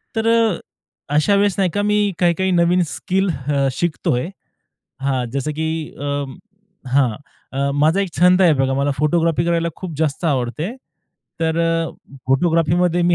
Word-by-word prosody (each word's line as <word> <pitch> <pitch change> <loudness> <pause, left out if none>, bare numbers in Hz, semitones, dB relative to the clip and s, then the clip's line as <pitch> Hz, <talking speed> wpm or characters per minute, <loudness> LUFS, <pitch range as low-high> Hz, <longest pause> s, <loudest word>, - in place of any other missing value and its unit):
तर 225 0 0
अ, 230 -5 +3 0.6
अशा 175 +7 +3
वेळेस 200 -2 +2
नाही 190 -2 +2
का, 205 - 0
मी 210 0 +2
काही-काही 180 +2 +2
नवीन 175 +1 +3
स्किल 190 +4 -1 0.2
अ, 140 -2 +1
शिकतो 155 -2 -1
आहे. 125 +8 -2 0.7
हां. 135 -2 0
जसं 140 +4 -2
की 160 - -1 0.3
अ, 145 0 -2 0.7
हां. 130 -5 +3 0.4
अ, 140 +1 0
माझा 155 +6 +3
एक 195 - -1
छंद 180 +2 +5
आहे 170 -3 +6
बघा, 135 -1 +1
मला 140 +1 +1
फोटोग्राफी 165 +2 +1
करायला 170 0 +1
खूप 180 -4 -7
जास्त 155 +1 -1
आवडते. 150 - -1 0.7
तर 160 0 0 0.7
फोटोग्राफीमध्ये 170 +4 +2
मी 175 0 +3
165 Hz, 150 wpm, -19 LUFS, 145-185 Hz, 0.7 s, आहे